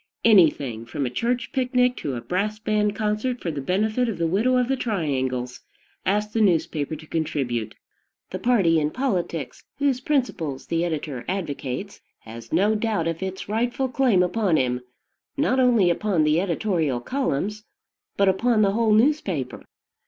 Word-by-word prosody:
Anything, 150 - +4
from 140 +2 -3
a 125 - -3
church 235 - -1
picnic 250 -2 +2
to 140 -3 -3
a 120 - -4
brass 205 - -2
band 210 -1 0
concert 215 +4 -1
for 170 - -3
the 145 -2 -4
benefit 215 - 0
of 215 - -3
the 170 - 0
widow 220 +10 +2
of 250 -1 +2
the 270 - +1
triangles, 130 - -2 0.5
asks 210 +2 0
the 225 - +1
newspaper 160 -6 +1
to 155 +1 -11
contribute. 135 -8 -2 0.6
The 185 - -4
party 190 -8 +3
in 150 -1 0
politics, 175 - -3
whose 275 -2 +1
principles 240 - -1
the 165 0 0
editor 150 -6 -3
advocates, 170 -1 -4 0.2
has 115 +1 -11
no 200 +6 +3
doubt 215 -6 0
of 165 +1 -3
its 190 0 -5
rightful 240 +5 -1
claim 245 -8 +3
upon 180 -2 +1
him, 125 -1 0 0.6
not 270 -2 +2
only 235 -8 +4
upon 180 -2 +1
the 155 +3 +3
editorial 170 - 0
columns, 210 - -2 0.5
but 200 - +3
upon 215 +3 +3
the 195 - +3
whole 220 +1 +2
newspaper. 210 - +1
190 Hz, 160 wpm, -24 LUFS, 155-230 Hz, 0.6 s, Anything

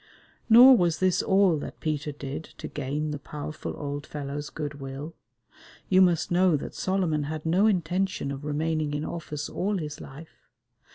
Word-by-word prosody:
Nor 250 +4 +10
was 170 -3 +2
this 185 0 +2
all 190 -5 +3
that - - -8
Peter 150 -1 -2
did 145 +2 -6
to - - -6
gain 150 +2 -3
the 145 - -4
powerful 150 +1 -6
old 145 0 -5
fellow's 145 0 -5
good 145 -2 -6
will. 135 +4 -6 0.8
You 185 0 +5
must 175 -3 +3
know 175 -2 +4
that - - -7
Solomon 180 -6 0
had 155 +1 -5
no 185 +6 +3
intention 185 -5 0
of 140 +1 -6
remaining 150 0 -1
in 150 - -2
office 150 -3 -5
all 200 +2 -1
his 150 -4 -6
life. 150 +4 -13
155 Hz, 165 wpm, -27 LUFS, 145-180 Hz, 0.8 s, Nor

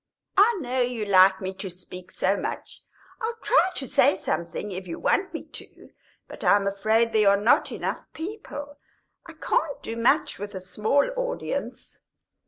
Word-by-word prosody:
"I 420 +3 +5
know 255 -1 -1
you 240 -3 -1
like 190 -1 +5
me 190 0 -3
to 190 0 -6
speak 180 0 -10
so 195 - +1
much - - -6 0.4
I'll 460 +1 -2
try 380 -7 +4
to 270 - -5
say 190 - +4
something 180 +2 -3
if 185 0 -6
you 165 - -5
want 380 -1 +1
me - - -6
to. - - -12 0.4
But - - -10
I'm 200 -1 +4
afraid 220 +4 +1
there 215 -2 +5
are 200 - +4
not 215 +4 +3
enough - - -4
people; 320 -6 -7 0.5
I - - -10
can't 305 -3 -1
do 225 - -5
much 255 +4 +2
with 205 0 -6
a - - -3
small 215 +9 +1
audience." - - -4
220 Hz, 170 wpm, -25 LUFS, 190-285 Hz, 0.5 s, I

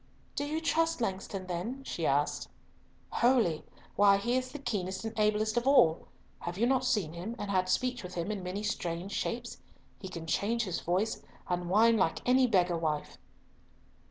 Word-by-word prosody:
"Do 285 - -2
you 310 +2 -1
trust 330 -1 +1
Langston 195 -3 -3
then?" 185 +10 -4
she 165 -10 -2
asked. 145 +2 0 0.6
"Wholly! 235 -10 +3 0.3
Why, 200 -1 +6
he 240 +5 0
is 255 0 -1
the - - -6
keenest 190 -7 -3
and 225 - -3
ablest 215 +1 +2
of 240 +2 +1
all. 175 - +5 0.3
Have 175 +1 -5
you 230 - +3
not 260 +1 +2
seen 210 -11 0
him 185 +7 -5
and 205 -2 -4
had 185 -1 +1
speech 250 +5 0
with 180 -1 -8
him 175 +4 -2
in 205 -2 -3
many 185 +3 -4
strange 180 -2 -3
shapes? 235 +3 -3 0.4
He 190 - -7
can 165 -3 -7
change 225 +8 0
his 185 -5 -2
voice, 190 +6 0 0.3
and 175 -1 -2
whine 225 +4 +5
like 185 +1 0
any 255 +1 +5
beggar 180 -6 +2
wife." 155 -2 -2
205 Hz, 180 wpm, -31 LUFS, 180-240 Hz, 0.6 s, Why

